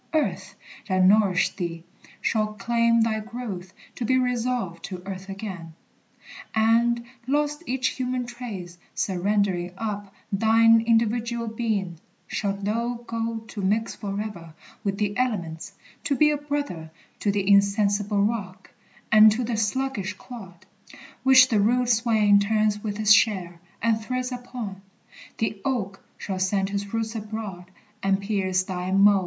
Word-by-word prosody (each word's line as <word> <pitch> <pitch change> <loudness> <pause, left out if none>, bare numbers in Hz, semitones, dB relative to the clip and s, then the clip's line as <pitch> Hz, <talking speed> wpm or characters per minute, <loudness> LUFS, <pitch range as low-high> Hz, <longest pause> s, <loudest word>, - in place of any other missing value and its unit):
Earth, 310 - -1 0.3
that 185 -1 +3
nourished 195 -2 +3
thee, 170 -3 -4 0.4
shall 215 -1 0
claim 230 +1 +2
Thy 220 -1 +1
growth, 215 -5 -6 0.2
to - - -5
be 260 +3 +2
resolved 245 -8 -1
to 185 -2 -7
earth 195 0 -7
again; 190 -5 -7 0.8
And, 235 +2 +3 0.2
lost 295 +2 0
each 260 +1 0
human 255 -1 -2
trace, 210 -8 -7 0.2
surrendering 190 -2 0
up 205 -2 -4 0.2
Thine 225 +2 +5
individual 230 +1 +1
being, 215 -7 -2 0.3
shalt 200 -1 -3
thou 235 +3 -2
go 230 -1 -3
To 205 - -5
mix 210 +4 0
forever 200 -5 -6 0.3
with 195 -2 -1
the 205 -1 -1
elements; 180 -11 -2 0.3
To 285 - +1
be 300 +2 +4
a 295 - 0
brother 285 - -4 0.3
to 205 - +1
the 200 -1 -1
insensible 200 0 +3
rock, 195 -4 -3 0.4
And 215 0 +8
to 245 +3 -2
the 235 0 -2
sluggish 215 -2 -1
clod, 190 -6 -11 0.6
which 260 0 +7
the 220 -4 +2
rude 245 +4 +2
swain 220 -3 +4
Turns 210 0 +1
with 205 -2 -3
his 215 -1 +6
share, 185 -5 +2 0.2
and 225 -1 +2
treads 255 +2 -3
upon. 245 -6 -6 0.6
The 220 -2 -2
oak 205 -8 -2
Shall 190 -2 -4
send 195 +1 +1
his 200 0 -3
roots 225 0 -2
abroad, 210 -5 -6 0.3
and 195 0 +2
pierce 195 -2 0
thy 185 -1 -4
mold. 200 +1 +5
215 Hz, 140 wpm, -25 LUFS, 195-235 Hz, 0.8 s, And